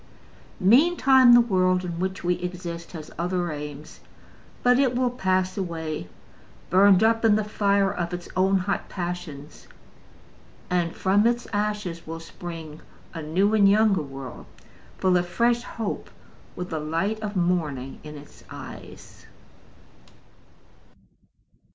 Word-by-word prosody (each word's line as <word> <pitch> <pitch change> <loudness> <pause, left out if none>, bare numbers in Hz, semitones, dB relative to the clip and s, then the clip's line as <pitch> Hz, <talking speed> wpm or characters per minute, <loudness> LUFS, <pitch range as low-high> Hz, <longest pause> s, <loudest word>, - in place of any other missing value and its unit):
Meantime, 260 - +6
the - - +8
world 185 -4 +1
in 170 -1 -5
which 190 +1 -3
we 180 0 +2
exist 175 -1 -6
has 155 -3 -8
other 175 -1 -1
aims. 150 0 -8 0.6
But 245 +1 +4
it 260 -3 +2
will 250 0 +1
pass 185 -5 0
away, 160 - -4 0.6
burned 190 +1 +6
up 225 +1 +3
in 220 -2 +5
the 215 - +1
fire 200 -1 +1
of 175 -2 -3
its 175 -1 -6
own 190 +1 +3
hot 195 +1 -2
passions; 175 -5 -6 1.0
and 175 -2 0
from 200 +3 +3
its 240 0 0
ashes 205 -5 -2
will 165 0 -5
spring 165 -2 -9 0.3
a 165 - -5
new 185 +7 +1
and 205 -2 +5
younger 205 -3 +4
world, 135 -3 -9 0.5
full 185 -1 +3
of 175 0 -1
fresh 235 +5 +1
hope, 225 -3 -5 0.5
with 180 0 -6
the 160 - -2
light 165 +8 -1
of 210 -1 -5
morning 155 -8 -1
in 150 -1 -9
its 145 0 -15
eyes. - - -11
185 Hz, 130 wpm, -25 LUFS, 165-210 Hz, 1.0 s, the